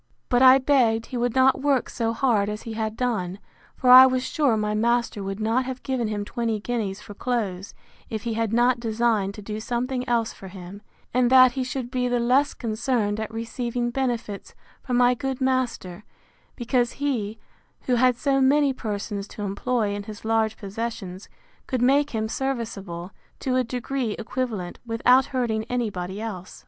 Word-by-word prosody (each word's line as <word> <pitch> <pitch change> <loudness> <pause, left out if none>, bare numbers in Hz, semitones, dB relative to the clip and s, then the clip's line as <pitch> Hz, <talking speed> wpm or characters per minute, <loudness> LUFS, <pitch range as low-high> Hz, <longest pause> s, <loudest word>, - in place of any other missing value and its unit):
But 245 0 +3
I 260 0 +9
begged 250 -5 +2
he 250 - -6
would 240 0 -1
not 265 0 +4
work 280 -3 +2
so 230 -1 -2
hard 225 -4 +1
as 210 0 -5
he 225 - -6
had 220 0 -3
done; 205 -8 -1 0.4
for 250 - +3
I 260 +1 +11
was 255 -1 0
sure 275 -7 +1
my 210 0 -1
master 235 0 0
would 195 +1 -4
not 225 +4 +1
have 260 0 -6
given 255 -4 -1
him 205 -1 -3
twenty 230 -1 -2
guineas 210 -4 -3
for 205 - -11
clothes, 200 -5 -3 0.3
if 220 -2 -4
he 235 - -2
had 225 -1 -1
not 240 +1 +3
designed 220 -3 0
to 210 - -9
do 210 +1 -5
something 250 +3 -2
else 230 -2 +1
for 195 - -11
him; 190 +1 -10 0.3
and 250 0 +3
that 255 -1 +7
he 260 +1 -2
should 255 -1 -4
be 250 -1 0
the 245 0 +1
less 255 +4 +2
concerned 220 -2 -1
at 220 0 -4
receiving 235 +1 -3
benefits, 240 -6 -3 0.3
from 250 -2 -1
my 245 0 +5
good 265 +1 -3
master, 245 -8 -1 0.5
because 240 -1 0
he, 230 -7 -2 0.4
who 255 - -1
had 250 +1 +4
so 270 0 +1
many 280 +1 +4
persons 205 -4 -4
to 210 - -8
employ 205 +2 -1
in 205 - -4
his 215 0 -9
large 220 -1 +1
possessions, 200 -2 -6 0.4
could 255 -3 -1
make 280 +3 +3
him 220 -3 -2
serviceable, 220 -9 -4 0.3
to 255 -1 -1
a 255 - +3
degree 245 -1 -3
equivalent, 225 -6 -4
without 245 +3 +3
hurting 235 -5 -1
any 240 -2 -1
body 185 +1 -5
else. 190 -5 -7
235 Hz, 180 wpm, -24 LUFS, 210-255 Hz, 0.5 s, I